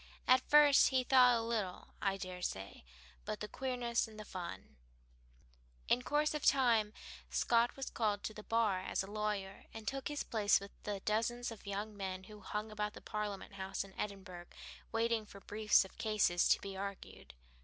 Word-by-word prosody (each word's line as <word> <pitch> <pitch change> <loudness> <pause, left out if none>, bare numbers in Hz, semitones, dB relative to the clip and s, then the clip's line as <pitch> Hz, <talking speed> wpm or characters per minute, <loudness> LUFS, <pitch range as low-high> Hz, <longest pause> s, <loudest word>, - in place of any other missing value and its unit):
At 255 0 +6
first 295 -1 +7
he 260 -1 +2
thought 250 -2 +6
o' 225 - -2
little, 210 -6 -2
I 195 -1 +1
dare 185 -1 -6
say, 95 - -4 0.4
but - - -4
the 210 - -4
queerness 245 -2 -1
and 215 -1 -12
the 215 - -7
fun." 170 - -7 1.1
In 245 - +4
course 300 +4 +1
of 300 - -3
time 235 -6 +4 0.4
Scott 235 0 +2
was 270 - -4
called 210 -3 0
to 215 - -4
the 210 - -8
bar 215 -4 +1
as 190 - -1
a 195 - -9
lawyer, 210 -2 -3
and 220 -1 -8
took 270 0 -2
his 295 0 -2
place 210 -3 +3
with 200 0 -10
the 205 -2 -3
dozens 230 +4 0
of 220 -2 -11
young 205 +2 -4
men 190 -2 -4
who 210 +2 -12
hung 210 +1 -4
about 210 0 -2
the - - -11
Parliament 210 -2 -4
House 190 0 -3
in 195 -1 -14
Edinburgh 190 -4 -6 0.4
waiting 225 0 +1
for 200 -1 -12
briefs 210 0 +3
of 190 - -15
cases 210 -5 +2
to - - +5
be 195 -1 -7
argued. 195 - -7
210 Hz, 185 wpm, -35 LUFS, 195-235 Hz, 1.1 s, first